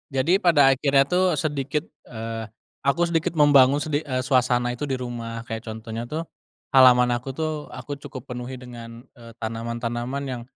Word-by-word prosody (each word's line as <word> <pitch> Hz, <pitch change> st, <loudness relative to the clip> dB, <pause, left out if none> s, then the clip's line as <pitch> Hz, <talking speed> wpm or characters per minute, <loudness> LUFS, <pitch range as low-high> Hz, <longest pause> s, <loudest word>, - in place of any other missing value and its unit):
Jadi 170 Hz, +9 st, +3 dB
pada 145 Hz, -7 st, +5 dB
akhirnya 135 Hz, 0 st, +3 dB
tuh 180 Hz, +3 st, +2 dB
sedikit, 145 Hz, 0 st, -2 dB, 0.2 s
eee, 115 Hz, -1 st, -6 dB, 0.4 s
aku 170 Hz, +5 st, +3 dB
sedikit 170 Hz, -1 st, 0 dB
membangun 145 Hz, -1 st, +5 dB
sedi 150 Hz, -1 st, 0 dB
eee, 130 Hz, -4 st, -3 dB
suasana 125 Hz, -2 st, +2 dB
itu 130 Hz, +4 st, -4 dB
di 135 Hz, -, -1 dB
rumah. 115 Hz, -2 st, -5 dB
Kayak 115 Hz, 0 st, -7 dB
contohnya 110 Hz, +1 st, -6 dB
tuh, 160 Hz, +5 st, -3 dB, 0.5 s
halaman 125 Hz, -2 st, +6 dB
aku 125 Hz, +2 st, -3 dB
tuh, 155 Hz, -2 st, -3 dB
aku 145 Hz, -1 st, -7 dB
cukup 130 Hz, -1 st, -9 dB
penuhi 125 Hz, +1 st, -5 dB
dengan, 120 Hz, -1 st, -10 dB, 0.2 s
eee, 115 Hz, -1 st, -13 dB
tanaman-tanaman 120 Hz, +4 st, -3 dB
yang 125 Hz, -3 st, -4 dB
130 Hz, 160 wpm, -24 LUFS, 120-145 Hz, 0.5 s, halaman